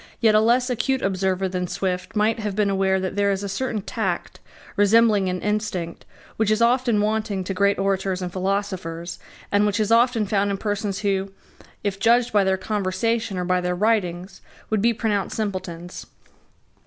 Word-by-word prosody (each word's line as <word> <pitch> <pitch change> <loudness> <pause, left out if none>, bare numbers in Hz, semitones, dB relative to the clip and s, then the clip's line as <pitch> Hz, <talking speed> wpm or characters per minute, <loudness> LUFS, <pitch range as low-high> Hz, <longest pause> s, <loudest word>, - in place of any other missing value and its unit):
Yet 220 -2 +4
a 215 - +6
less 245 +3 +2
acute 260 +2 0
observer 190 0 0
than 180 -1 -3
Swift 180 +1 -3
might 215 +2 +2
have 210 -3 -3
been 205 -1 +1
aware 190 0 +2
that 185 0 -3
there 200 0 +2
is 195 0 -1
a - - -2
certain 215 0 -3
tact, - - -3 0.4
resembling 205 -1 +4
an 180 0 -2
instinct, 210 -5 -3 0.3
which 220 -1 +1
is 215 0 +2
often 235 -2 +3
wanting 210 -2 -1
to 195 - -3
great 200 +1 +2
orators 195 -1 0
and 180 -1 -5
philosophers, 185 -3 -3 0.3
and 205 0 +3
which 205 +1 0
is 215 0 0
often 230 -1 +4
found 200 0 +1
in 200 - -1
persons 205 -1 -2
who, 195 -1 -1 0.5
if 200 -1 -2
judged 235 +3 +3
by 205 -2 +4
their 190 0 +1
conversation 210 +2 -1
or 180 - -2
by 180 0 +1
their 180 0 -1
writings, 190 -3 -1 0.3
would 215 -2 +2
be 235 +2 +4
pronounced 210 -4 -1
simpletons. 185 -5 -5
200 Hz, 180 wpm, -23 LUFS, 190-220 Hz, 0.5 s, a